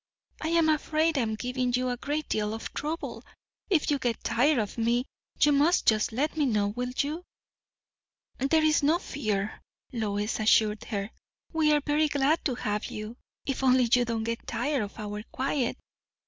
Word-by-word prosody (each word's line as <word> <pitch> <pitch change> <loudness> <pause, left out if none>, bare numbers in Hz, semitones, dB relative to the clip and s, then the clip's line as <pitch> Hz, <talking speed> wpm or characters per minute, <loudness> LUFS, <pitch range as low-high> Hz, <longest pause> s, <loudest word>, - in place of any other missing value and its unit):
"I 315 - -2
am 330 -1 +3
afraid 315 +1 +2
I 275 - +2
am 220 -2 -1
giving 250 +2 -2
you 255 +1 +1
a 245 - -1
great 290 +4 -3
deal 215 0 -1
of 225 - -7
trouble! 315 +3 -4 0.5
If 320 -6 +2
you 285 - +1
get 240 -3 -2
tired 250 +5 +3
of 210 -4 -1
me, 235 +2 +1 0.3
you 295 - +5
must 295 +5 +3
just 215 0 +3
let 280 +8 -1
me 300 -3 +2
know. 210 -4 +1
Will 245 +4 -3
you?" 305 +5 -1 1.2
"There 310 +4 +3
is 310 -1 +4
no 305 +4 +3
fear," 215 - -3 0.3
Lois 210 -2 -1
assured 215 0 +3
her. 200 -2 -3 0.4
"We 315 -2 +3
are 295 -1 +3
very 300 +1 +2
glad 290 +2 +1
to 260 - +1
have 210 -3 -2
you. 215 +2 -6 0.3
If 270 -1 -2
only 255 -1 +5
you 235 - 0
do 235 -1 -2
not 220 - -2
get 230 +1 -4
tired 270 +2 0
of 205 -1 -6
our 210 -1 -5
quiet. 265 -1 -1
250 Hz, 185 wpm, -28 LUFS, 220-300 Hz, 1.2 s, you